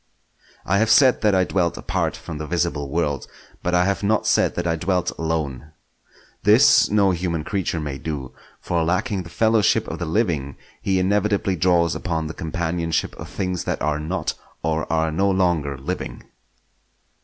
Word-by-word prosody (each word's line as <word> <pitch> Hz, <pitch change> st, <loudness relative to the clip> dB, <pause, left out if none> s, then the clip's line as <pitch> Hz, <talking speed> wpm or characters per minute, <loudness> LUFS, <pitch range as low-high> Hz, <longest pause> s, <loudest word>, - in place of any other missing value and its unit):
I 100 Hz, +2 st, +2 dB
have 110 Hz, 0 st, +2 dB
said 130 Hz, +1 st, +5 dB
that 105 Hz, -2 st, +3 dB
I 95 Hz, -, +4 dB
dwelt 90 Hz, -2 st, 0 dB
apart -, -, -2 dB
from 75 Hz, -, -7 dB
the 80 Hz, -, -5 dB
visible 85 Hz, -4 st, -1 dB
world, 75 Hz, -3 st, -1 dB, 0.3 s
but 90 Hz, 0 st, 0 dB
I 90 Hz, 0 st, +4 dB
have 100 Hz, 0 st, 0 dB
not 105 Hz, +1 st, +1 dB
said -, -, +2 dB
that 90 Hz, -, -2 dB
I 85 Hz, -1 st, +1 dB
dwelt 90 Hz, +1 st, 0 dB
alone. 80 Hz, -3 st, -3 dB, 0.7 s
This -, -, +6 dB
no 100 Hz, -2 st, +3 dB
human 85 Hz, -3 st, -2 dB
creature 90 Hz, -1 st, -2 dB
may 75 Hz, -3 st, -4 dB
do; 70 Hz, -4 st, -5 dB, 0.3 s
for 85 Hz, -1 st, -1 dB
lacking 95 Hz, +4 st, 0 dB
the 85 Hz, -, -10 dB
fellowship 110 Hz, +1 st, +2 dB
of -, -, -5 dB
the 85 Hz, -, -2 dB
living, 80 Hz, -, -1 dB, 0.2 s
he 95 Hz, -1 st, +1 dB
inevitably 100 Hz, +1 st, +1 dB
draws 85 Hz, -1 st, +2 dB
upon 80 Hz, -2 st, -2 dB
the 80 Hz, -, -5 dB
companionship 85 Hz, -1 st, -2 dB
of -, -, -8 dB
things 90 Hz, -2 st, -3 dB
that -, -, -2 dB
are 75 Hz, 0 st, 0 dB
not, 80 Hz, +5 st, -2 dB, 0.3 s
or 80 Hz, -1 st, -1 dB
are 80 Hz, 0 st, +1 dB
no 95 Hz, +5 st, +1 dB
longer, 85 Hz, -7 st, +1 dB
living. 65 Hz, -2 st, -5 dB
85 Hz, 170 wpm, -22 LUFS, 80-95 Hz, 0.7 s, This